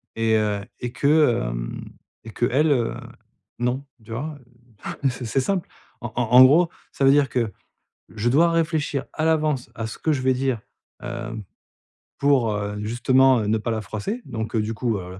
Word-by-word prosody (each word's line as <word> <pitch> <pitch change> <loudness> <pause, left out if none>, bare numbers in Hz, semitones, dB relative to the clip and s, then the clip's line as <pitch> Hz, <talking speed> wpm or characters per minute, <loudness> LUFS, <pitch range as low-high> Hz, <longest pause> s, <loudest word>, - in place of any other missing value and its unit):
Et 115 0 +2
heu, 105 -2 0 0.2
et 120 - -4
que, 140 - +3
hem, - - -5 0.4
et 115 - -9
qu'elle, 135 +7 +2
heu, 120 -5 +1 0.6
non, 125 +3 -1 0.2
tu 110 - -13
vois? 145 +6 -4 0.7
Heu, 135 - +4
c'est 125 0 -6
c'est 115 +4 0
simple. 185 +5 -1 0.3
En 120 -2 -5
en 120 - +1
en 125 +1 +10
gros, 160 +6 +5 0.2
ça - - -2
veut 135 - +7
dire 145 -2 +3
que, 115 -4 -1 0.6
je 110 +2 -1
dois 165 +7 +4
réfléchir 155 -4 0
à 155 - -1
l'avance 155 -5 +1
à 110 0 -4
ce - - -8
que 160 - 0
je 135 - -2
vais 130 0 +3
dire, 130 -3 -1 0.4
heu, 120 -2 -5 0.8
pour, 135 -5 +3
heu, 105 0 -3
justement, 130 +3 +3
heu, 105 - -2
ne 110 +1 +2
pas 115 +2 -3
la 110 -1 -2
froisser, 110 - -4
donc 110 0 -4
du 110 +1 -1
coup, 115 -2 -1
heu, 90 0 -8
125 Hz, 185 wpm, -23 LUFS, 110-140 Hz, 0.8 s, en